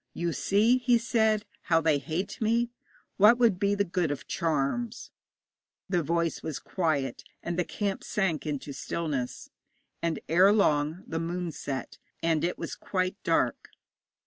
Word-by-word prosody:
'You 170 -1 -1
see,' 220 +9 +3
he 245 -1 +4
said, 220 -2 +1 0.2
'how 165 -1 +3
they 155 -3 +2
hate 160 +11 -4
me. 230 +2 +2 0.5
What 210 +4 +7
would 230 -7 +3
be 200 0 +2
the 200 - +2
good 180 -3 -1
of 145 - -4
charms?' 170 - -1 0.8
The 180 -3 +1
voice 170 +2 0
was 155 - -4
quiet, 150 -8 -1 0.2
and 170 - -2
the 180 - +1
camp 200 +2 -3
sank 175 -7 -1
into 145 -1 -4
stillness, 140 -5 -3 0.5
and 165 -2 -1
ere 185 +5 +6
long 155 -4 +2
the 165 - -3
moon 170 +1 -3
set, 135 -3 -5 0.2
and 165 -2 +2
it 175 - 0
was - - -5
quite 185 -1 -2
dark. - - +1
175 Hz, 150 wpm, -28 LUFS, 155-205 Hz, 0.8 s, What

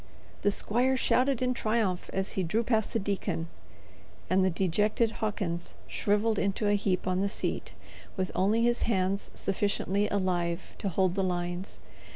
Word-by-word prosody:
The 205 - +3
squire 245 +6 +1
shouted 255 0 +2
in 250 0 +2
triumph 215 -6 0
as 190 0 -1
he 190 - -1
drew 210 +7 +1
past 220 -2 +1
the - - +1
deacon, 195 -5 -2 0.8
and 190 +1 +4
the 190 - +4
dejected 210 +6 +1
Hawkins 175 - -2
shrivelled 210 - +1
into 200 +1 0
a 205 - +4
heap 200 -2 +1
on 185 0 +1
the 200 - +1
seat, - - -3 0.4
with 185 -1 -1
only 210 +5 +2
his 240 0 +2
hands 195 -1 0
sufficiently 200 +1 0
alive 180 -3 -1
to 200 - -1
hold 185 0 +2
the 195 - 0
lines. 175 +1 -2
200 Hz, 160 wpm, -29 LUFS, 185-215 Hz, 0.8 s, and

